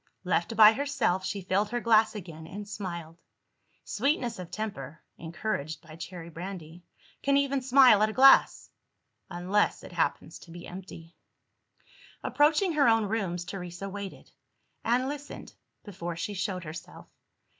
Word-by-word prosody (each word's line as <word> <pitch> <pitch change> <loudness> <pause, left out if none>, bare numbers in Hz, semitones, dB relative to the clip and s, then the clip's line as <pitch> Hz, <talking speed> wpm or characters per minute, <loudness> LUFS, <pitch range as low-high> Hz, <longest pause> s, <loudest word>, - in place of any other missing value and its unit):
Left 225 - 0
by 215 0 +9
herself, 260 -9 0
she 200 0 -4
filled 200 +3 0
her 240 +2 -1
glass 220 -2 +3
again, 165 -5 -8
and 200 +4 -8
smiled. 170 -5 -7 0.6
Sweetness 250 - -1
of 180 -2 -7
temper 155 -9 -6 0.2
(encouraged 160 -3 -4
by 155 - -11
cherry 170 0 -8
brandy) 175 -1 -8 0.4
can 280 0 +3
even 280 -1 +1
smile 255 -4 +6
at 215 - +3
a - - -5
glass 270 +2 +5 0.6
unless 185 +3 0
it - - -10
happens - - -2
to - - -16
be 170 +1 -10
empty. 175 -2 -10 1.1
Approaching 310 +5 +2
her 290 -4 +4
own 225 -1 +4
rooms, 190 -5 -2
Teresa 180 0 -6
waited, 200 -1 -8 0.5
and 245 +3 +1
listened, 290 0 -7 0.3
before 175 -4 -6
she 205 +5 -4
showed 190 -2 -3
herself. 160 0 -9
200 Hz, 140 wpm, -28 LUFS, 175-230 Hz, 1.1 s, by